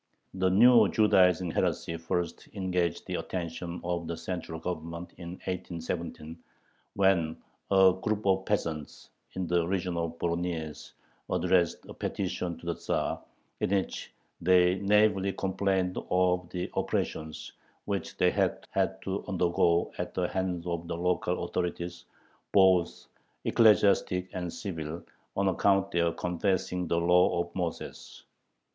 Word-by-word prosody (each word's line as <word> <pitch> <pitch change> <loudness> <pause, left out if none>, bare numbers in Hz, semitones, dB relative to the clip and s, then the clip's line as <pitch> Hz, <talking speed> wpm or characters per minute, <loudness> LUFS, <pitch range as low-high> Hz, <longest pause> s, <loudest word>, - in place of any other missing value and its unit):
The 95 0 +1
new 120 +6 +7
"Judaizing" 90 -5 +4
heresy 85 - -1
first 85 +1 -3
engaged 90 -3 -1
the - - -3
attention 85 -1 -4
of 85 -1 -2
the 85 0 -4
central 85 -1 -5
Government 85 0 -5
in 85 0 -6
1817, 85 -2 -5 0.6
when 90 -5 +2 0.3
a 95 -1 +6
group 110 -1 -1
of 95 -1 +3
peasants 80 -7 -3 0.2
in 95 - -2
the 85 -1 +1
region 90 -2 -1
of 85 0 -3
Voronyezh 85 -3 -3 0.4
addressed 90 -3 +1
a - - -8
petition 90 -3 -3
to 85 - -14
the 85 - 0
Tzar - - -2 0.4
in - - 0
which 100 -1 -1 0.3
they 90 +1 +4
naively 100 -1 +3
complained 95 -1 0
of 90 -1 +2
"the 90 -1 -3
oppressions 80 -1 -3 0.3
which 100 -4 -3
they - - +4
had - - 0
had 95 0 0
to 95 +1 -3
undergo 85 -2 +2
at - - -4
the - - +1
hands 90 -2 -2
of 85 -1 -3
the 85 - -3
local 90 0 0
authorities, 85 0 -3 0.5
both 95 -3 +4 0.4
ecclesiastic 100 -4 +4
and 90 -2 -3
civil, 80 -4 -5 0.3
on 100 0 +2
account 95 +1 +3
of 100 - -18
their 85 -1 +2
confessing 90 0 -1
the 85 - +1
law 90 +1 +4
of 85 0 -6
Moses." 90 -3 -5
90 Hz, 135 wpm, -29 LUFS, 85-95 Hz, 0.6 s, new